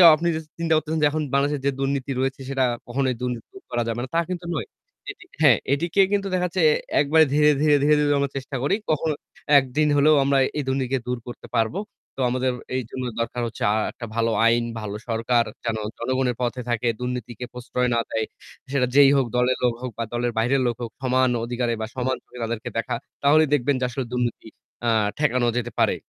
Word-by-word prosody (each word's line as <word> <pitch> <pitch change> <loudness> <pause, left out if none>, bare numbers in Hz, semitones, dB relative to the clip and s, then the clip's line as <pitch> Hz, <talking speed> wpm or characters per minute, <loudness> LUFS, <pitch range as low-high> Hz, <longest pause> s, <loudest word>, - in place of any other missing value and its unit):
আপনি 170 +2 -2
অদা 160 - -3 0.2
চিন্তা 165 -1 +1
করতেছেন 155 +1 0
যে 150 - +6
এখন 155 0 -1
বাংলাদেশে 140 +1 +2
যে 140 - +3
দুর্নীতি 135 0 -1
রয়েছে 135 +1 -1
সেটা 135 -1 +1 0.2
কখনোই 130 0 0
দুর্নীতি 125 -2 -3
দূর 390 - -13
করা 120 0 0
যাবে 115 +1 -2
না, - - -4
তা - - +4
কিন্তু 180 -1 -4
নয়। - - -3 0.7
হ্যাঁ, 130 -8 +7 0.2
এটিকে 170 +6 +2
কিন্তু 200 -1 +1
দেখা 180 0 +1
যাচ্ছে 180 0 -2 0.4
একবারে 160 +2 +5
ধীরে, 150 0 +5
ধীরে, 150 -1 +5
ধীরে, 150 +1 +5
ধীরে 145 0 +3
আমরা 140 -1 0
চেষ্টা 135 +1 -6
করি। 190 - +2 0.2
কখনো 155 0 +1 0.5
একদিন 140 +4 0
হলেও 150 +2 +5
আমরা 140 0 +2 0.2
এই 145 - 0
দুর্নীতিকে 130 -1 0
দূর 125 0 -1
করতে 120 - -9
পারবো। 115 - +1 0.4
তো 135 - -4
আমাদের 130 +1 0 0.2
এই 130 - 0
জন্য 130 - -5 0.2
দরকার 120 +1 -2
হচ্ছে 115 - -6
আ - - +1 0.2
একটা 115 - -8
ভালো 115 0 +1
আইন, 115 +1 +4 0.2
ভালো 105 -1 -5
সরকার 115 +1 +2 0.2
যেন 115 -2 -1 0.2
জনগণের 130 0 0
পথে 125 +1 -1
থাকে, 120 0 0
দুর্নীতিকে 125 -1 -4
প্রশ্রয় 125 0 -1
না - - +2
দেয়। 110 -1 0 0.5
সেটা 125 -3 +2
যেই 140 -1 +8
হোক 130 -3 +2
দলের 125 +1 +2
লোক 120 -1 +3
হোক 125 -2 -4
বা 115 - -1
দলের 120 0 0
বাইরের 130 +4 +2
লোক 120 - 0
হোক 115 -1 -4
সমান 130 0 +2 0.2
অধিকারে 120 0 -1
বা - - -1
সমান 130 0 0
চোখে 125 - -13
তাদেরকে 115 -1 -3
দেখা। 115 - -1 0.3
তাহলেই 155 +1 +5
দেখবেন 140 0 +2
যে 125 - 0
আসলে 125 +1 -3
দুর্নীতি 120 -2 -2 0.4
আ - - +4 0.3
ঠেকানো 125 -5 +2
যেতে 120 0 -2
পারে। - - +3
130 Hz, 205 wpm, -24 LUFS, 120-145 Hz, 0.7 s, যেই